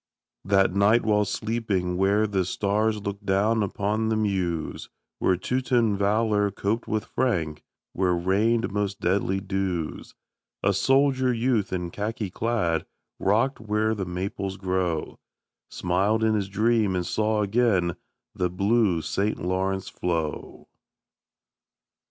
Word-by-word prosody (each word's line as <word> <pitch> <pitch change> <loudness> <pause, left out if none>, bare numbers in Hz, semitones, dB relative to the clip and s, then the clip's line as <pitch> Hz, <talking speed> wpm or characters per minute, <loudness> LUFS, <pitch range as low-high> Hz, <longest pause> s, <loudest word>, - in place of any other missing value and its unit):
That 95 -1 +3
night 100 +4 +4
while 105 -1 +2
sleeping 100 -4 -1
where 100 +3 +3
the 100 -3 0
stars 105 +3 0
Look 100 0 -5
down 105 +3 +2
upon 105 +2 -1
the 110 - +1
Meuse, 95 -7 -2 0.3
Where 90 - +2
Teuton 120 0 +1
valor 105 +1 +2
coped 105 +3 -2
with 110 -1 -1
Frank, 85 -12 -1 0.3
Where 90 -1 +1
rained 105 +7 +1
most 100 0 -2
deadly 95 +1 +1
dews, 95 -5 -3 0.5
A 100 - +3
soldier 135 +4 +3
youth 115 -3 0
in 90 -2 -3
khaki 105 0 -3
clad, 100 -8 -1 0.3
Rock'd 115 +8 +1
where 110 0 0
the 100 -3 -3
Maples 95 +2 -4
grow, 90 -4 -2 0.5
Smiled 100 +5 0
in 110 0 +3
his 100 -3 -1
dream 110 -1 +2
and 90 -1 -1
saw 110 +1 +1
again 100 -6 +2 0.4
The 90 -1 -1
blue 100 -2 +1
St. 105 +2 -1
Lawrence 95 +2 -1
flow. 80 -4 -3
100 Hz, 125 wpm, -25 LUFS, 95-110 Hz, 0.5 s, night